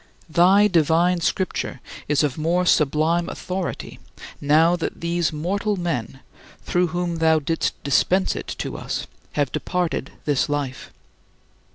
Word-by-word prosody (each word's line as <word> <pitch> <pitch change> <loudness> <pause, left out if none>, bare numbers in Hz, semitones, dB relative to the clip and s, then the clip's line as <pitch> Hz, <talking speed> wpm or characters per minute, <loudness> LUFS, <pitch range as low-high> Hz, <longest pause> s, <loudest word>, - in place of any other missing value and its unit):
Thy 190 +5 +5
divine 170 0 +2
Scripture 185 +2 -1 0.3
is 150 -1 +2
of 145 -3 0
more 170 +3 +1
sublime 160 +2 +2
authority 185 0 -5 0.4
now 160 +4 +4
that 175 - -4
those 170 -1 0
mortal 200 +7 -1
men 135 -7 -3 0.4
through 180 0 +1
whom 175 0 -2
thou 160 -1 +4
didst 160 +2 -1
dispense 185 +7 +2
it - - -6
to - - -4
us - - -4 0.3
have 145 -3 0
departed 175 -6 -2
this 145 -2 +1
life. 145 -3 -3
165 Hz, 130 wpm, -22 LUFS, 150-180 Hz, 0.4 s, Thy